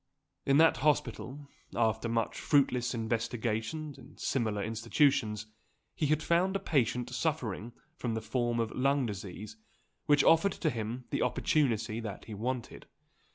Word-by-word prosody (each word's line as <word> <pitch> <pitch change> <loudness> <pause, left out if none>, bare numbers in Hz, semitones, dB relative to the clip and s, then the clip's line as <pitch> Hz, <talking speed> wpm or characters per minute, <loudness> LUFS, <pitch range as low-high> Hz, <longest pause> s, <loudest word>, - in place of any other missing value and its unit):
In 140 - +5
that 160 -2 +6
hospital, 140 0 -1 0.3
after 115 0 +1
much 115 -1 -1
fruitless 125 -4 +2
investigation 115 +5 -2
in 130 +3 -15
similar 110 -6 -1
institutions, 115 -1 +1 0.5
he 150 - 0
had 155 +1 +1
found 180 +4 +2
a - - +1
patient 125 - +1
suffering 125 - -2 0.3
from 120 -7 -2
the 110 - -2
form 120 0 -1
of 115 -1 -1
lung 135 +1 +2
disease, 100 - -6 0.5
which 145 -2 +5
offered 165 +5 +5
to 155 - -1
him 115 +2 -4
the - - 0
opportunity 115 -7 +1
that 110 -4 -6
he 110 - -8
wanted. 120 +3 -4
120 Hz, 140 wpm, -31 LUFS, 110-145 Hz, 0.5 s, that